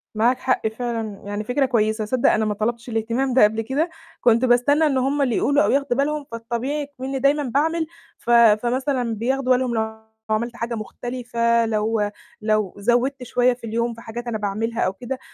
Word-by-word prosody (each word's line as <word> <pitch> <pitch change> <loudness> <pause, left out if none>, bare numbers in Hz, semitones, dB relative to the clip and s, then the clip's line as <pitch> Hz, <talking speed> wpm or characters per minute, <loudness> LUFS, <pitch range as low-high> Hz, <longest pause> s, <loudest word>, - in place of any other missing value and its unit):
معاك 240 +4 +2
حق، 255 -4 0
فعلًا، 225 -2 -4
يعني 205 +1 -3
فكرة 250 +5 +1
كويسة. 220 -3 +1
صدّق 245 +3 +2
أنا 215 0 +1
ما 210 - 0
طلبتش 235 +3 -3
الاهتمام 235 +4 -1
ده 255 - +6
قبل 220 +2 +3
كده، 280 +9 -1 0.3
كنت 235 +1 +4
باستنى 270 +6 +4
إن 280 -3 +2
هُم 275 +3 +1
اللي 250 -5 +1
يقولوا، 285 +1 +3
أو - - +2
ياخدوا 275 -2 +1
بالهم، 295 +1 0
فالطبيعي 235 +6 -3
إكمنّي 270 -1 -5
دايمًا 285 +2 +2
باعمل، 315 +5 0 0.3
ف - - -10
فمثلًا 235 +2 +3
بياخدوا 255 +3 +1
بالهم 250 -1 -1
لو 220 0 -3 0.3
عملت 235 +2 -1
حاجة 235 0 -3
مختلفة، 235 +1 -1
لو 215 -1 0 0.3
لو 215 -3 0
زودت 245 +5 +1
شوية 250 +1 +2
في 245 - -17
اليوم 235 +2 -1
في 230 - -12
حاجات 235 +2 -7
أنا 230 -2 -1
باعملها 215 +3 -2
أو 185 - +1
كده. 250 +6 -6
240 Hz, 185 wpm, -22 LUFS, 220-260 Hz, 0.3 s, ده